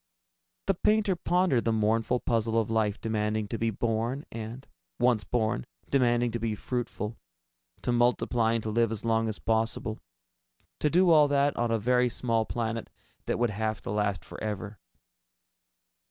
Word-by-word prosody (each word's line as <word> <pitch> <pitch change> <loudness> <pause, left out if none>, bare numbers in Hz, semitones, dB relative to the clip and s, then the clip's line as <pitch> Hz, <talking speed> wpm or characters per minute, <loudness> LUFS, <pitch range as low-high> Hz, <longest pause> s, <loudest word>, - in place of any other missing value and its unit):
The - - +3
painter 210 -3 +2
pondered 175 -7 +2
the 115 - +1
mournful 110 +3 +1
puzzle 115 -1 +1
of 110 0 -1
life 110 -2 +1
demanding 110 -1 -1
to 115 - -3
be 115 - +1
born 115 +5 -1
and, 115 +4 -7 0.3
once 120 -4 +3
born, 110 - 0 0.3
demanding 120 -3 +3
to 115 - -3
be 110 -1 -1
fruitful... 115 -2 -4 0.7
to - - 0
multiply 120 -1 +2
and 115 -1 -1
to 110 - -2
live 115 0 +2
as 110 0 -4
long 115 0 +2
as 110 - -4
possible 110 0 -1 0.8
to 150 - +2
do 180 +2 +4
all 150 -2 +7
that 140 0 +2
on 120 0 0
a 115 - +2
very 125 +3 +2
small 115 -1 0
planet 115 -1 -3 0.4
that - - 0
would 120 -2 +1
have 110 +1 -2
to - - -5
last 105 -4 -1
forever. 105 -1 -5
115 Hz, 160 wpm, -28 LUFS, 110-125 Hz, 0.8 s, all